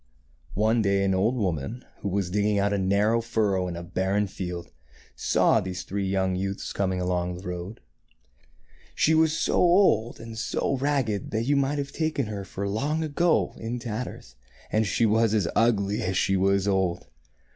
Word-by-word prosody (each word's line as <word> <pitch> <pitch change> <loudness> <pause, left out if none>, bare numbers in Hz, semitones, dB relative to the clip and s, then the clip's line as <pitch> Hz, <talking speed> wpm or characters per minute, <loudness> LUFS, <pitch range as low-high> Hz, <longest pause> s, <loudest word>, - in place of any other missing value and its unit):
One 110 +3 +2
day 100 -1 +2
an 95 -1 +2
old 105 +7 +2
woman, 95 - -3
who 100 - -3
was 95 -2 -1
digging 105 +1 +1
out 100 +1 +1
a 100 - 0
narrow 100 +4 +2
furrow 105 -5 0
in 90 - -4
a 85 - -6
barren 95 +4 0
field, 90 -3 -6 0.4
saw - - +3
these 90 0 -5
three 100 +1 -3
youths 95 0 -1
coming 95 -2 -1
along 90 0 -1
the 90 +2 -9
road. 90 +4 -6 1.1
She 160 - +3
was 160 0 +3
so - - 0
old 175 - +3
and 115 -1 -8
so 135 - -1
ragged 130 -8 -1
that 110 +1 -1
you 145 +3 +2
might 140 +1 +1
have 140 -1 -3
taken 155 -4 -1
her 105 -2 -5
for 95 +1 -5
Long 145 +10 -1
Ago 160 +2 +1
in 115 +2 -4
tatters, 115 - -6 0.4
and 110 0 +2
she 115 - +2
was 110 0 +3
as 100 -6 +1
ugly 105 -3 +2
as 95 0 -1
she 95 - +2
was 95 +1 +2
old. 95 -3 0
100 Hz, 175 wpm, -26 LUFS, 95-115 Hz, 1.1 s, saw